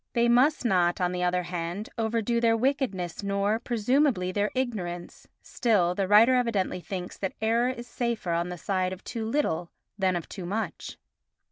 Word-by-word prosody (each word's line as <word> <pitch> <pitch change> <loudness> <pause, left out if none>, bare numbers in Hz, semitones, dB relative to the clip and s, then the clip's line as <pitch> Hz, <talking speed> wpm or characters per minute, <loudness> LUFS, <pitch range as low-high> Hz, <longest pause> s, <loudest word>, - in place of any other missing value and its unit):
They 235 -1 +3
must 255 +4 +3
not, 180 -5 +2
on 180 -1 +1
the 180 0 -3
other 180 0 +1
hand, 175 +3 -4
overdo 230 +1 0
their 230 -1 +3
wickedness 230 - -1
nor, 200 +2 0
presumably, 240 -4 +1
their 205 +2 0
ignorance, 185 -9 -4 0.2
still 200 -8 +1
the 195 +1 -1
writer 215 +5 +6
evidently 230 -7 0
thinks 180 -1 -6
that 190 - -2
error 230 +3 +2
is 240 -2 -5
safer 235 -6 -2
on 170 +1 0
the 180 - -5
side 185 +1 -1
of 190 - -10
too 225 -2 -4
little 200 - 0 0.3
than 190 -2 +2
of 170 - -4
too 180 -3 -7
much. 200 -4 -4
205 Hz, 170 wpm, -27 LUFS, 180-235 Hz, 0.3 s, writer